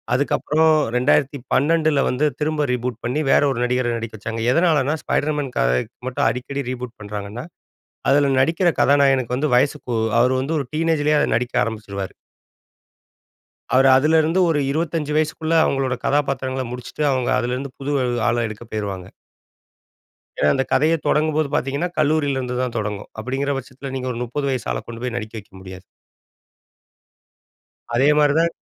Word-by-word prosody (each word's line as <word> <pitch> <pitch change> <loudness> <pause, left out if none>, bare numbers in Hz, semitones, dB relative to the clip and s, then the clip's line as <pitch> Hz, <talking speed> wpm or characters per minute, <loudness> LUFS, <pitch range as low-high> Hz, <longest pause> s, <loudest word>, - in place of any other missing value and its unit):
அதுக்கப்றம் 155 +3 +2 0.2
2012ல 140 +3 +2
வந்து, 130 +4 0 0.2
திரும்ப 150 0 0
ரீபூட் 125 -1 -3
பண்ணி, 125 +5 -1
வேற - - +5
ஒரு 120 - -3
நடிகர 125 -1 0
நடிக்க 115 -1 -6
வச்சாங்க. 115 +2 -4
எதனாலனா, 155 -3 +2
'ஸ்பைடர்மேன்' 145 -3 -1
கதைக்கு 60 0 0
மட்டும் 130 -3 0
அடிக்கடி 125 +4 -4
ரீபூட் 125 -1 -7
பண்றாங்கன்னா, 105 +4 -6 0.6
அதுல 140 0 +4
நடிக்கிற 165 +6 +2
கதாநாயகனுக்கு 135 -3 +3
வந்து 150 +2 0
வயசுக்கு 130 -1 0 0.3
அவரு 125 +2 +3
வந்து 140 +5 -2
ஒரு 140 - -3
டீனேஜ்லயே 155 -2 +1
அத - - +2
நடிக்க 120 +1 -2
ஆரம்பிச்சுருவாரு. 100 -3 -5 1.6
அவரு 135 +1 +5
அதுலருந்து 160 +4 +3
ஒரு 150 -2 +2
25 160 -1 -2
வயசுக்குள்ள, 155 +1 -1
அவங்களோட 135 -3 0
கதாபாத்திரங்கள 135 -2 0
முடிச்சிட்டு, 125 +4 -5
அவங்க 130 -2 0
அதுலருந்து, 125 +2 -3
புது 140 +1 -3 0.4
ஆள 120 - +1
எடுக்க 110 +1 -8
பேயிருவாங்க. 100 -4 -4 1.3
ஏன்னா, 75 - +3
அந்த 135 - +1
கதையே 155 +4 +3
தொடங்கும்போது 155 -1 +1
பாத்தீங்கன்னா, 140 +7 -1
கல்லூரில 145 -2 +1
இருந்துதான் 125 -1 -3
தொடங்கும். 105 -1 -4
அப்படிங்கற 135 +5 -2
பட்சத்துல, 135 +1 -9
நீங்க 130 -1 -3
ஒரு 120 - -5
30 140 +3 -3
வயசு 125 -4 -3
ஆள - - -3
கொண்டு 115 0 -8
போயி 125 -1 -3
நடிக்க 110 -1 -6
வைக்க 100 - -19
முடியாது. 95 0 -10 2.1
அதே 135 +4 +4
மாரிதான், 155 +3 +3
135 Hz, 140 wpm, -21 LUFS, 120-150 Hz, 2.1 s, வேற